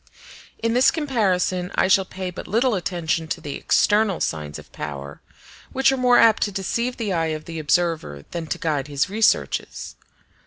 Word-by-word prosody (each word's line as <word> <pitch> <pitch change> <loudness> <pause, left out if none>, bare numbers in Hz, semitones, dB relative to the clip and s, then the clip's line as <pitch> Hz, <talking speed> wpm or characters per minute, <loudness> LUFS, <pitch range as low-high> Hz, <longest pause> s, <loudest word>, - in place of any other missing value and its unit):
In 230 0 -1
this 250 +2 +5
comparison 190 - 0
I - - +3
shall 190 0 +4
pay 185 0 -6
but 180 - -8
little 235 +4 +2
attention 170 -4 -2
to - - -3
the 145 - -6
external 210 -3 +2
signs 75 -2 -3
of - - -14
power, 70 -1 -7 0.5
which 270 0 +4
are - - +1
more 250 -1 +4
apt 225 -1 +5
to 205 - +1
deceive 235 +6 -2
the 215 -5 -2
eye 165 -2 0
of 155 - -15
the 165 -1 -6
observer 155 - 0
than 170 -2 -4
to - - -2
guide 145 -4 -1
his 145 +6 -1
researches. 220 +1 0
185 Hz, 180 wpm, -23 LUFS, 155-225 Hz, 0.5 s, this